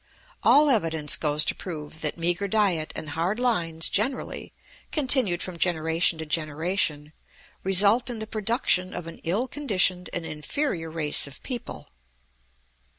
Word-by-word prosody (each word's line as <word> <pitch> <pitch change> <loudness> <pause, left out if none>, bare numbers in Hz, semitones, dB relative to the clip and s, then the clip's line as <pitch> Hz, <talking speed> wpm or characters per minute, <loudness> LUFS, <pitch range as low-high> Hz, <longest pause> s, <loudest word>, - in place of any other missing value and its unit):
All 295 0 +5
evidence 160 - +1
goes 150 -1 +2
to - - +1
prove 155 -3 -8
that 150 +1 -2
meagre 175 +4 0
diet 190 -6 +1
and 155 - -5
hard 175 +9 -1
lines 165 -10 +1
generally, 245 +6 -2 0.4
continued 255 - +4
from 185 -2 -7
generation 165 -1 +1
to 160 - -6
generation, 155 0 -2 0.5
result 200 +6 +4
in 240 - -4
the 220 - -4
production 215 -4 -1
of 175 - -6
an 165 - -10
ill 205 +10 -1
conditioned 195 -10 +1
and 170 - -4
inferior 165 - -3
race 155 -3 -1
of 140 - -11
people. 245 -2 -6
175 Hz, 140 wpm, -25 LUFS, 160-215 Hz, 0.5 s, All